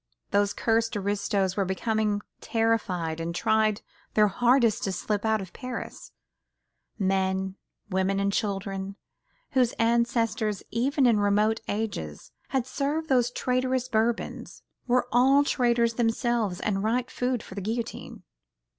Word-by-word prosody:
Those 205 0 +3
cursed 225 -1 +1
aristos 200 -1 0
were 200 - +1
becoming 210 +2 0 0.2
terrified 190 -8 0
and 170 +1 -3
tried 215 +1 +2 0.3
their 210 -1 +5
hardest 240 +1 +3
to 195 - -1
slip 205 +3 -2
out 220 -1 +2
of 185 - -12
Paris: 255 -2 -7 0.9
men, 190 -1 0 0.4
women 190 +1 +1
and 200 0 0
children, 195 -2 -2 0.6
whose 255 -4 +2
ancestors, 230 -3 +1
even 270 +4 +1
in 230 -4 +4
remote 210 +2 +2
ages, 215 +1 -4 0.2
had 265 -3 -1
served 295 +4 -2
those 245 -3 +3
traitorous 255 0 0
Bourbons, 230 -1 -2 0.2
were 250 0 +2
all 270 +4 +5
traitors 235 -4 +2
themselves 225 -4 0
and 195 -2 -1
right 240 +3 0
food 250 -2 -1
for - - -11
the 200 - -5
guillotine. 225 +4 -4
220 Hz, 130 wpm, -27 LUFS, 200-240 Hz, 0.9 s, their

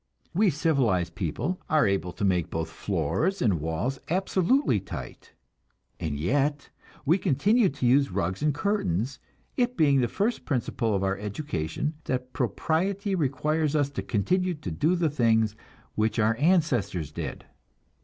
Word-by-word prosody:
We 205 +3 +4
civilized 130 - +1
people 95 - -3
are 155 -1 +4
able 95 -3 0
to 100 - -2
make 90 -3 +1
both 80 -2 -3
floors 165 - -1
and 95 -10 +1
walls 80 - -2
absolutely 190 - +2
tight, 85 -10 -9 0.7
and 75 -3 -2
yet 140 - 0 0.3
we 165 +7 +3
continue 195 - +3
to 135 -2 -4
use 135 +3 +4
rugs 90 +6 -2
and 150 0 +3
curtains, 140 - -1 0.4
it 245 -1 +1
being 140 -4 +4
the 120 - +2
first 210 - -1
principle 115 -5 -1
of 95 - 0
our 95 0 0
education 105 - -3
that 125 -1 -3
propriety 185 - 0
requires 155 -1 0
us 145 -2 +1
to 140 - -3
continue 180 - 0
to 125 - -6
do 155 - +1
the 170 -2 +1
things 110 -5 +2 0.4
which 110 +2 0
our 115 0 +3
ancestors 135 - +1
did. - - -6
135 Hz, 145 wpm, -27 LUFS, 100-165 Hz, 0.7 s, We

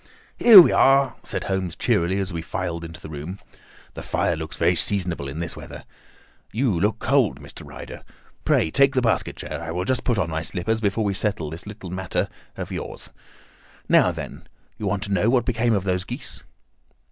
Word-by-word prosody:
"Here 225 -5 +11
we 175 - +8
are!" 135 -1 +4
said - - -3
Holmes 95 -3 -2
cheerily 90 +3 +1
as 95 -2 -2
we 85 - -3
filed 85 -2 -4
into 80 -1 -9
the - - -10
room. 75 +5 -7 0.6
"The - - -7
fire 85 - 0
looks 80 0 -7
very 85 +2 +3
seasonable 90 -3 0
in 70 +3 -6
this 85 -2 -4
weather. - - -10 0.7
You 120 +2 +1
look 105 +4 +1
cold, 120 - +1
Mr. 70 - -11
Ryder. - - -9 0.4
Pray 80 - +2
take 140 - +4
the 130 - +2
basket 115 - 0
chair. - - -6
I 85 - -6
will 90 +3 -2
just 130 +2 0
put 120 -4 0
on 85 -4 -1
my 80 0 -2
slippers 105 +6 -2
before 105 +1 0
we 100 -1 0
settle 95 -6 -2
this 85 +5 -8
little 100 -4 -8
matter 95 -1 -2 0.3
of - - -5
yours. - - -6 0.8
Now, - - +5
then! - - -8 0.3
You 105 - -2
want 100 +1 -1
to 100 -1 -3
know 100 +4 +2
what 125 -1 +2
became 115 -1 +1
of 100 - -1
those 90 -1 0
geese?" - - -4
95 Hz, 195 wpm, -23 LUFS, 85-110 Hz, 0.8 s, Here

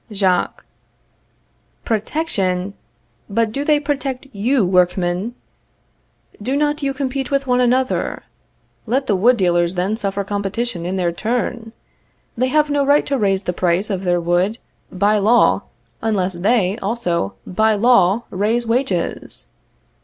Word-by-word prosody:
Jacques. 190 -3 0 1.2
Protection! 200 - -1 0.6
But 225 +1 0
do 275 +5 -2
they 295 0 +3
protect 275 -3 -3
you, 235 +2 +1
workmen? 180 +4 +1 1.1
Do 260 +6 -1
not 295 0 0
you 275 -1 0
compete 270 -1 -3
with 275 -1 0
one 250 -1 +2
another? 255 +1 0 0.6
Let 265 +4 0
the 205 - +1
wood 235 +6 +4
dealers 175 -2 +1
then 185 +4 0
suffer 200 -2 -2
competition 200 -1 -3
in 185 - -2
their 180 -2 0
turn. 230 +3 -3 0.6
They 255 +2 +1
have 300 +3 +2
no 285 -1 +2
right 285 +1 +3
to 280 - 0
raise 195 -2 +1
the 180 - -2
price 180 +4 0
of 190 -1 -2
their 175 -1 +1
wood 175 +6 +1 0.3
by 205 +3 +2
law, 225 +4 +3 0.4
unless 195 -4 0
they, 195 +2 +1
also, 180 - -2
by 220 +3 +2
law, 220 -1 +4
raise 220 +5 0
wages. 230 - -2
215 Hz, 135 wpm, -19 LUFS, 185-250 Hz, 1.2 s, wood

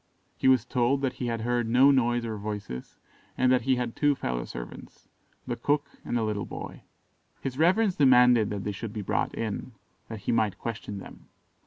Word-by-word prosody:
He - - 0
was 130 -4 +5
told 125 +3 +1
that 135 -1 0
he 125 -1 -4
had 115 -1 -2
heard 120 0 0
no 130 +4 +6
noise 120 -3 +2
or 110 -1 -3
voices, 105 -11 -6 0.4
and 130 0 +3
that 130 - +4
he 130 +2 +2
had 120 -2 -3
two 145 -1 +3
fellow 60 - -3
servants - - -10 0.4
the - - -2
cook 145 0 0 0.2
and 120 - -1
a 115 - 0
little 105 -2 -2
boy. - - -8 0.6
His 135 +1 -5
reverence 190 +4 +3
demanded 125 -5 +6
that 100 -2 -4
they 105 - -2
should 105 +2 -6
be 105 - -4
brought - - -1
in, 115 +2 -4 0.4
that 110 -2 -7
he - - -1
might 110 -4 +1
question 110 -3 -5
them. 95 - -11
120 Hz, 195 wpm, -27 LUFS, 105-130 Hz, 0.6 s, no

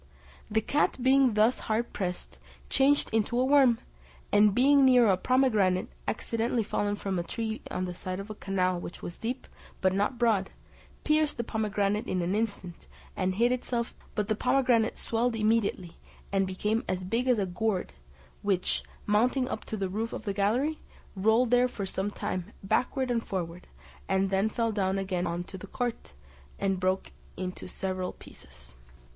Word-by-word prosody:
The 220 +1 +2
cat, 290 +7 +1
being 260 -3 +4
thus 220 +4 +4
hard 225 +2 0
pressed, 180 -2 -4 0.3
changed 280 +2 +3
into 225 +2 +1
a 255 - +3
worm, 265 -4 +5 0.5
and 205 -1 +5
being 275 +2 +5
near 250 -2 +6
a 195 - +5
pomegranate 210 -5 +2 0.2
accidentally 230 +1 -1
fallen 205 0 -1
from 195 -2 -2
a - - -1
tree 220 +5 -4
on 185 - -2
the 180 - -4
side 185 +1 -5
of 200 +2 -7
a - - -4
canal 185 -3 0
which 175 - -8
was 175 - -5
deep, 245 +3 -4 0.3
but 185 -1 +2
not 205 +6 0
broad, 220 -5 +2 0.5
pierced 305 -1 +2
the 235 - -1
pomegranate 210 -2 -1
in 180 -1 0
an 175 +3 0
instant, 205 -5 -3 0.3
and 185 0 0
hid 235 +4 +3
itself, 240 -1 -2 0.2
but 210 -2 0
the 215 - +2
pomegranate 245 -1 +2
swelled 230 +1 0
immediately, 215 -5 0 0.3
and 195 -1 +2
became 210 +5 -1
as 185 0 -2
big 230 +7 -1
as 250 -2 +4
a 200 - +1
gourd, 190 +1 -2 0.5
which, 195 -3 0 0.2
mounting 250 +5 +2
up 220 - -5
to 220 - -4
the 195 -1 -1
roof 220 +5 -3
of - - -6
the 200 - -1
gallery, 240 +10 +1 0.4
rolled 220 +5 +3
there 245 0 +5
for 215 -5 -5
some 190 +1 -2
time 205 -2 -4
backward 255 +5 0
and 230 -1 0
forward; 180 -2 -4 0.4
it 190 0 +2
then 195 +3 +2
fell 230 +1 0
down 195 -2 0
again 185 -2 -1
into 175 +3 -4
the - - -9
court, 245 - -4 0.4
and 195 -2 0
broke 185 +1 0 0.3
into 185 0 -5
several 185 -1 -3
pieces. 65 -1 -15
210 Hz, 170 wpm, -29 LUFS, 190-240 Hz, 0.5 s, near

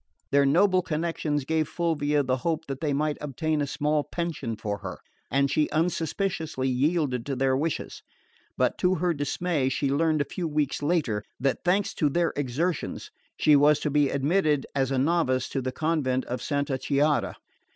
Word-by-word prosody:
Their 140 0 +4
noble 185 +5 +4
connections 155 -4 -2
gave 160 0 0
Fulvia 150 -4 0
the 130 0 0
hope 160 +4 -2
that 135 -1 -6
they 155 -3 0
might 150 +1 0
obtain 150 +2 -1
a 145 - -1
small 150 +1 0
pension 155 -10 -4
for 105 -1 -4
her, - - -6 0.3
and 140 0 +2
she 150 0 +2
unsuspiciously 160 -2 -1
yielded 135 -1 +1
to 140 - -1
their 130 0 +2
wishes; 155 +3 -3 0.6
but - - +1
to 180 +1 +3
her 175 +1 +1
dismay 145 -1 -1
she 135 +1 0
learned 155 +2 +2
a - - 0
few 170 +4 -4
weeks 150 -3 -1
later, 145 -10 0 0.2
that, 135 0 0
thanks 190 +3 +1
to 150 - +1
their 170 +3 +1
exertions, 145 +4 -2 0.3
she 150 - +5
was 145 +1 +5
to 150 - -1
be 145 -1 +3
admitted 145 +1 +1
as 135 -2 +1
a 135 - 0
novice 130 -3 +1
to 135 - -2
the 130 0 -2
convent 140 -5 0
of 125 - -4
Santa 140 -2 -1
Chiara. 145 +2 +1
150 Hz, 175 wpm, -26 LUFS, 135-165 Hz, 0.6 s, she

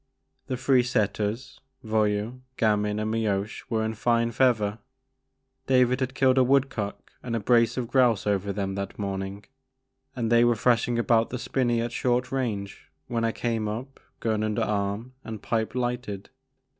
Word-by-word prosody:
The 130 - -2
three 130 0 +4
setters, 110 -1 -1 0.2
Voyou, 110 +2 0 0.2
Gamin, 105 -1 +1
and 110 0 -1
Mioche 105 -2 -1
were 110 -1 0
in 110 - -2
fine 115 +1 +1
feather, 110 -3 +2 0.4
— 135 0 -49
^David 125 -1 +4
had 130 -1 -2
killed 130 0 +4
a - - +6
woodcock 125 -6 0
and 120 -2 -3
a - - 0
brace 115 +2 +3
of 125 -2 -1
grouse 120 -4 +3
over 100 -1 0
them 100 -1 -2
that 100 0 -5
morning, 100 0 -4 0.3
— 130 0 -48
and 115 -3 -1
they 120 0 +6
were 120 -1 +4
thrashing 120 +1 +2
about 115 -1 +3
the 125 - -3
spinney 120 -1 0
at 120 0 -2
short 125 0 0
range 110 -7 -3 0.2
when 115 +3 -2
I 115 - +2
came 115 -2 -2
up, 120 +6 -6 0.2
gun 110 -2 0
under 110 -1 0
arm 105 +4 -2
and 110 -1 -6
pipe 110 +2 -2
lighted. 120 -5 -3
115 Hz, 170 wpm, -26 LUFS, 105-125 Hz, 0.4 s, a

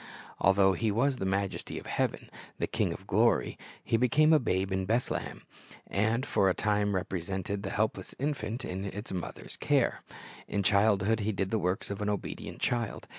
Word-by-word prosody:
Although 95 0 +5
He 110 +5 0
was 130 +6 +2
the 95 - -2
Majesty 95 0 -2
of - - -7
heaven, - - -2 0.3
the - - 0
King - - 0
of - - -7
glory, - - +2 0.3
He 115 - +1
became 135 +6 +4
a 155 - +6
babe 95 -6 0
in 95 0 0
Bethlehem, 115 +4 -1 0.4
and 110 +6 0
for 95 - +3
a 95 - +1
time 105 -1 +1
represented 95 +2 -3
the 100 - -4
helpless 110 +2 -2
infant 135 -4 -2
in 95 +2 -4
its 100 +2 -6
mother's 90 -2 -5
care. - - +1 0.5
In 100 - -1
childhood 105 +1 +3
He 110 +1 0
did 95 -2 -2
the 110 - +2
works 90 +2 -1
of 100 - -4
an 105 - 0
obedient 105 - -4
child. 120 -3 -1
100 Hz, 180 wpm, -30 LUFS, 95-115 Hz, 0.5 s, a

